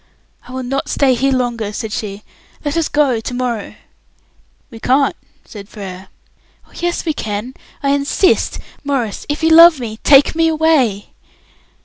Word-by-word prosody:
"I - - -11
will 260 0 -5
not 270 +2 -3
stay 270 -2 +2
here 270 +3 +1
longer," 240 -5 -1
said 215 0 -5
she. 205 -1 -5 0.4
"Let 290 +1 -1
us 330 -2 0
go 280 -6 +2
to 225 - -6
morrow." 245 -4 -3 1.0
"We 225 - -10
can't," 270 +4 +2 0.3
said 205 -1 -11
Frere. 190 -3 -9 0.6
"Oh, - - -26
yes, 345 +1 -3
we 315 - 0
can. 220 0 -5 0.3
I 280 - +1
insist. 285 +7 +1 0.3
Maurice, 265 -7 -3
if 295 +2 -3
you 320 - +4
love 330 -2 +8
me, 220 -3 -6
take 280 -1 +5
me 325 0 +2
away." 305 -10 +1
255 Hz, 155 wpm, -17 LUFS, 220-290 Hz, 1.0 s, love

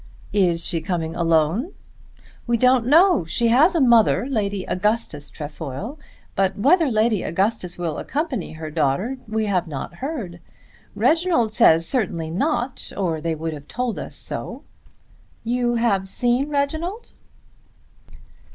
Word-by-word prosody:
"Is 175 -4 +2
she 165 -3 -1
coming 165 -3 -3
alone?" 170 - +1 0.7
"We 235 0 +2
don't 250 0 +3
know. 335 - +5
She 230 +8 0
has 300 +10 +4
a - - +3
mother, 235 -5 +4
Lady 205 -7 -2
Augustus 185 -6 -1
Trefoil, 160 - -7 0.4
but 195 0 +1
whether 320 - +4
Lady 220 -2 +2
Augustus 190 0 -1
will 170 -3 -3
accompany 280 - -3
her 155 -1 -7
daughter 165 - 0
we 220 0 -1
have 185 -4 0
not 145 -4 -6
heard. 240 - -5 0.6
Reginald 325 -10 +2
says 165 -9 +5
certainly 170 - 0
not, 255 - -2
or 170 -5 -1
they 165 0 -1
would 160 +1 -4
have 145 -1 -10
told 245 -2 -3
us - - -7
so. - - -6 0.8
You 240 +1 0
have 205 -5 +1
seen 245 +7 0
Reginald?" 315 +10 -2
215 Hz, 135 wpm, -22 LUFS, 170-255 Hz, 0.8 s, know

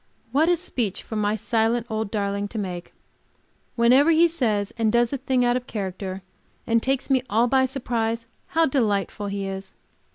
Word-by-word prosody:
What 305 +6 +3
a 350 - +5
speech 250 - -3
for 220 - -7
my 210 0 +1
silent 225 +2 0
old 220 -2 -2
darling 200 -1 -1
to 220 - -8
make! 180 -4 -5 0.8
Whenever 250 +6 +5
he 330 +1 +6
says 220 -11 -1
and 225 -2 +1
does 235 +2 +2
a - - 0
thing 260 -1 +1
out 240 0 +2
of 250 0 -3
character, 190 -2 -5 0.4
and 230 0 +2
takes 270 +2 -1
me 260 -1 +4
all 225 +3 +3
by 260 +1 +3
surprise, 230 -3 -2 0.2
how 330 0 +2
delightful 210 -7 0
he 200 0 -3
is! 195 0 -6
230 Hz, 175 wpm, -24 LUFS, 205-260 Hz, 0.8 s, he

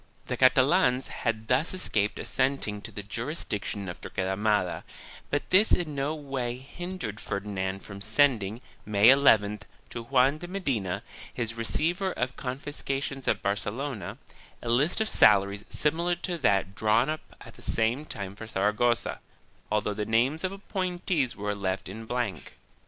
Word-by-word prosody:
2 - - -18
The - - -1
Catalans 130 +1 +4
had 110 -1 -2
thus 135 +9 +2
escaped 105 - 0
assenting 130 -6 0
to - - -9
the 105 - -7
juris 120 - -3
diction 100 -1 -3
of 85 - -7
Torquemada, 95 0 0 0.5
but 145 - -1
this 200 +4 +6
in 165 -4 +1
no 140 +2 -1
way 135 -5 -3
hindered 135 - -6
Ferdinand 95 -1 -3
from 100 -1 -9
sending, 110 -1 +3 0.2
May 105 +2 +5
llth, 105 -7 +5 0.3
to 120 - -5
Juan 135 +3 +3
de 175 - -7
Medina, 115 - -2 0.3
his 115 -2 -3
receiver 170 - 0
of 125 0 -2
con 125 0 -4
fiscations 140 -1 -4
at - - +1
Barcelona, 105 +2 -3 0.5
a 120 - -3
list 145 - +3
of 220 - +1
salaries 100 - +4
similar 170 +4 +1
to 175 -1 -4
that 100 - +2
drawn 110 +4 +3
up 155 0 -2 0.2
at - - -12
the - - -16
same 115 +6 0
time 100 -9 -6
for 110 +2 -8
Saragossa, 105 +4 +1 0.5
although 105 0 +1
the 105 - -2
names 125 - +1
of 185 - 0
appointees 180 - -2
were 105 0 -2
left 95 -2 -2
in 110 +4 -7
blank. 125 0 -3
120 Hz, 155 wpm, -28 LUFS, 105-145 Hz, 0.5 s, this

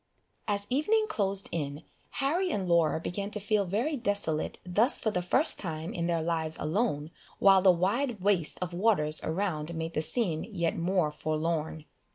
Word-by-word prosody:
As 200 -1 0
evening 425 - +2
closed 195 - 0
in, 145 -1 -4 0.4
Harry 350 +7 +1
and 195 - -2
Laura 170 -2 +3
began 200 +4 -4
to 210 - -4
feel 210 0 +1
very 235 - -1
desolate 200 - -1
thus 210 +9 +2
for 220 - -1
the 180 - -1
first 260 - +4
time 160 -2 -4
in 170 -1 -2
their 165 -2 0
lives 160 -1 -1
alone, 155 -3 -1 0.3
while 195 -1 +6
the 190 - +5
wide 210 +7 0
waste 185 -4 +1
of 175 -1 -5
waters 175 -6 +2
around 165 -2 -2
made 160 +1 -4
the 155 - 0
scene 170 -3 -1
yet 170 -7 -2
more 175 -2 0
forlorn. 155 0 -2
180 Hz, 170 wpm, -29 LUFS, 160-210 Hz, 0.4 s, while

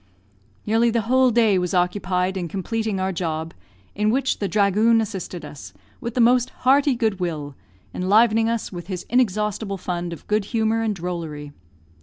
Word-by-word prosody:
Nearly 225 +2 +3
the 230 0 +1
whole 255 +4 +3
day 220 -5 +3
was 180 +1 -2
occupied 180 +1 0
in 180 -2 -3
completing 210 +3 -2
our 190 0 0
job, 160 -2 -3 0.4
in 210 +1 0
which 265 +3 0
the 200 - -2
"dhragoon" 215 +3 +3
assisted 190 -6 -5
us, 145 -1 -10 0.3
with 235 0 -5
the - - 0
most 245 +1 +4 0.2
hearty 275 +1 +4
good 220 -5 0
will, 155 -5 -3 0.4
enlivening 220 +4 +3
us 230 -1 -2
with 175 -2 -8
his 185 -3 -5
inexhaustible 210 -4 0
fund 175 -1 -4
of 170 - -9
good 210 -1 0
humour 225 0 0
and 220 -2 -1
drollery. 165 -5 -5
205 Hz, 165 wpm, -22 LUFS, 180-225 Hz, 0.4 s, most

